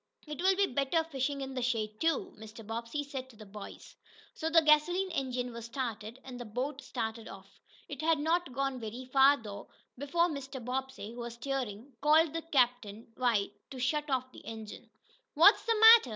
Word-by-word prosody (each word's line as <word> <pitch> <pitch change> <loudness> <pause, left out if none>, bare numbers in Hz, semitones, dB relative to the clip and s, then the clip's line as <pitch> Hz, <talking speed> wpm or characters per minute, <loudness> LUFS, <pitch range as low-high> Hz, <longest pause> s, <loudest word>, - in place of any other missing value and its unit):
"It 300 +1 -6
will 380 +1 +4
be 400 +1 +3
better 280 +3 +1
fishing 280 -2 -2
in 265 0 -5
the 255 - -3
shade, 220 -3 -2
too," 325 -2 0
Mr. 220 +1 -11
Bobbsey 230 +6 -4
said 265 -2 -6
to 240 - -16
the 215 0 -12
boys. 200 0 -11 0.4
So 320 - -3
the 325 0 +5
gasoline 350 +5 +3
engine 250 -5 -2
was 230 -1 -7
started, 230 -1 -5
and 250 -2 -8
the - - -4
boat 260 +6 -4
started 225 -3 -4
off. 195 0 -13 0.3
It - - -6
had 320 0 +3
not 325 +1 0
gone 270 0 -2
very 235 +3 -6
far, 270 +2 +5
though, 205 -4 -9 0.3
before 290 +6 +1
Mr. 275 -4 -6
Bobbsey, 255 -2 -4
who 245 - -9
was 235 0 -6
steering, 250 -1 -4
called 310 +1 +4
to 330 - -2
Captain 245 -8 0
White 230 -6 +1 0.2
to 265 - -9
shut 295 +4 -1
off 255 -1 -1
the - - -12
engine. 220 -2 -9 0.5
"What's 345 +8 +7
the 455 - +3
matter?" 445 - +9
260 Hz, 190 wpm, -31 LUFS, 230-300 Hz, 0.5 s, matter